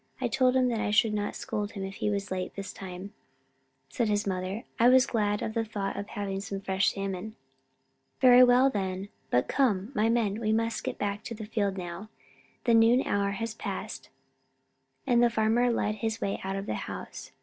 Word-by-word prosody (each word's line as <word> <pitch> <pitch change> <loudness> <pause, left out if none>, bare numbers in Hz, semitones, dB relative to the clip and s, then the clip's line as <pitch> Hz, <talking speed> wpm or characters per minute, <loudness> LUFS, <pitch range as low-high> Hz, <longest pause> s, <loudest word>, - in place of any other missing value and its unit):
I - - 0
told 255 -1 +2
him 250 -2 +3
I 215 -2 -1
should 210 +1 +3
not 205 -1 -2
scold 205 0 -4
if 195 0 -5
he - - 0
was 200 -1 -2
late 185 -1 -3
this 195 0 -6
time," 190 +1 -8 0.7
said 225 - -1
his 205 0 +1
mother. 190 +3 -3 0.2
"I 235 +2 +6
was 260 0 +6
glad 210 -2 0
of 220 - -3
the 230 - 0
thought 205 -3 -4
of 205 - -5
having 195 -1 -4
some 200 -1 -5
fresh 190 0 +1
salmon." 195 +1 -5 0.8
"Very 250 -1 +8
well, 250 +2 +6
then. 190 -1 -3 0.2
But 125 - +2
come, 230 -5 +1
my 215 0 +2
men, 225 -3 +1
we 215 -1 +1
must 230 0 -1
get - - -4
back 205 0 -2
to 230 - -5
the 215 0 -7
field 205 -3 -1
now. 175 +3 -6 0.5
The 235 - +3
noon 230 +3 +5
hour 200 0 +1
has 225 +2 -3
passed." - - -6 1.0
And 240 -2 +3
the 240 - +5
farmer 230 +2 +2
led 215 -2 -1
the 225 -1 -1
way 200 - -2
out 190 0 -3
of 195 0 -4
the - - -2
house. - - -7
210 Hz, 195 wpm, -28 LUFS, 195-230 Hz, 1.0 s, Very